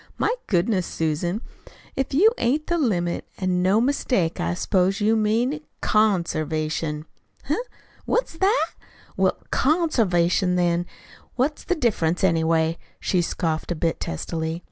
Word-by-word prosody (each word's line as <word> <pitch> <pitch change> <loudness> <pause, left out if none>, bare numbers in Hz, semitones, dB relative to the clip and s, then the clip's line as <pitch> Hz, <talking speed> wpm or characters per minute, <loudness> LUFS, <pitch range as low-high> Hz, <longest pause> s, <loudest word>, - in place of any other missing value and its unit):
"My - - +1
goodness, 185 0 +1
Susan 170 +6 -2 0.2
Betts, - - -17 0.2
if 270 - -2
you 430 +10 +6
ain't 290 +6 +1
the 345 0 0
limit, 175 - 0
an' 185 -2 0
no 190 +4 +3
mistake! 240 -9 0
I 85 +1 -1
s'pose 190 - +1
you 215 +2 +3
mean 230 +7 +1 0.2
CONservation." 155 -6 0 0.4
"Heh? 295 - 0 0.5
What's - - 0
that? 400 +5 +3 0.5
Well, - - +2
CONservation, 200 - +2
then. 175 0 +1 0.5
What's 280 +4 0
the 365 - 0
difference, 190 - 0
anyway?" 165 -2 +2 0.2
she 180 - +1
scoffed 165 -1 -2
a - - 0
bit 165 +1 -1
testily. 160 - -3
185 Hz, 130 wpm, -24 LUFS, 165-240 Hz, 0.5 s, you